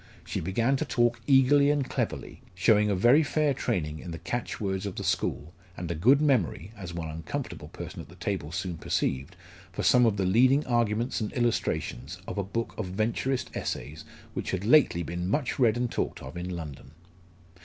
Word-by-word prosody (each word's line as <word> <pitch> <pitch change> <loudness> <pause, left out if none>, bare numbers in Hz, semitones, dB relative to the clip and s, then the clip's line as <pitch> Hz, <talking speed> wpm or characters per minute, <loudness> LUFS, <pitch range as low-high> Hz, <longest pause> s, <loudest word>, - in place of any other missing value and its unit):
She - - -3
began 115 +10 +1
to 150 - -1
talk 120 -5 +1
eagerly 140 +1 +5
and 145 -2 +1
cleverly, - - -3
showing 105 +3 +4
a 100 - +2
very 120 +11 +5
fair 150 -1 +1
training 75 -10 -2
in 90 - -8
the 85 - -5
catch 120 +7 -4
words 95 -1 -2
of 95 - -5
the - - -4
school, 80 +4 -1 0.2
and 85 -1 -4
a - - +1
good 125 - +5
memory 115 - +1
as 95 -4 -7
one 85 -1 -4
uncomfortable 80 0 -5
person - - -8
at - - -13
the - - -14
table 75 - -3
soon 90 -1 -3
perceived 70 +6 -1 0.4
for 90 - -4
some 125 -1 +5
of 105 -2 +1
the 95 - +1
leading 130 +9 +4
arguments 120 0 0
and 105 - -2
illustrations 95 - -1
of - - -3
a - - 0
book 115 +5 -3
of 105 - -2
Venturist 115 +7 -1
Essays 75 +2 -4 0.3
which - - -4
had 95 +1 -2
lately 120 - +5
been 85 +2 -3
much 140 +4 -1
read 120 -3 +4
and 120 -1 -1
talked - - -2
of 65 +4 -8
in 90 +1 -4
London. 75 -5 -7
105 Hz, 195 wpm, -28 LUFS, 85-125 Hz, 0.4 s, eagerly